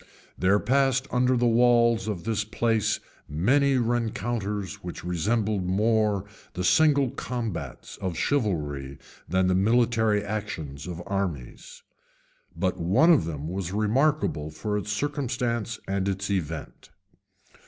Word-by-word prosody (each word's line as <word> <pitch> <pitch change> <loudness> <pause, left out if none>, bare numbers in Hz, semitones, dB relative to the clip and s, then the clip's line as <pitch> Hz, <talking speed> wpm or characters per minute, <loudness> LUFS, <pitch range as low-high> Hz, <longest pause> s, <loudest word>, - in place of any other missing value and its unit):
There 95 +3 +3
passed 135 +2 +2
under 125 0 +2
the 120 - +2
walls 115 -2 +4
of 100 -6 -3
this 110 -1 -1
place 110 0 0 0.3
many 130 - +3
rencounters 110 -4 -2
which 90 - -7
resembled 100 +4 0
more 105 0 +2 0.3
the 90 - -2
single 140 - +4
combats 115 -7 -5
of 90 -4 -4
chivalry 75 - -1 0.3
than 95 +1 +2
the 90 - +2
military 110 +1 +2
actions 90 -9 -5
of 90 -1 -6
armies; 90 -11 -4 0.7
but 90 +1 -1
one 100 - +4
of 155 - +4
them 75 -2 -5
was 90 +1 -4
remarkable 110 - +1
for 105 +6 -3
its 105 0 -2
circumstances 120 -3 -2
and 95 0 -1
its 100 +1 -2
event. 80 -5 -4
105 Hz, 120 wpm, -26 LUFS, 90-120 Hz, 0.7 s, walls